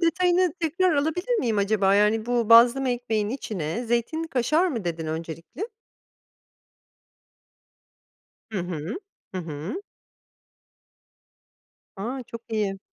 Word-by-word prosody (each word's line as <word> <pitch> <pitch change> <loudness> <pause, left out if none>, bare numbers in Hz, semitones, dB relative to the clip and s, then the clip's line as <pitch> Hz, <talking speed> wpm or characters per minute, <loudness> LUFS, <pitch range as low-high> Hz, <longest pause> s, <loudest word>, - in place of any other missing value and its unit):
detayını 355 +1 +3
tekrar 335 +2 +2
alabilir 355 +11 0
miyim 225 - 0
acaba? 200 -1 +3
Yani 215 +2 +3
bu 240 -2 +1
"Bazlama 240 +3 +7
ekmeğinin 225 -4 -1
içine 195 - -3
zeytinli 240 +8 -1
kaşar." 305 +7 +2
mı 230 - -3
dedin 165 -2 -3
öncelikle? 165 - -5 2.8
Hı 215 - -2
hı, 170 0 -4 0.4
hı - - -1
hı. 165 - -5 2.2
A! 245 +7 -4
çok 230 -1 -9
iyi. 210 -3 -1
230 Hz, 100 wpm, -25 LUFS, 195-300 Hz, 2.8 s, Bazlama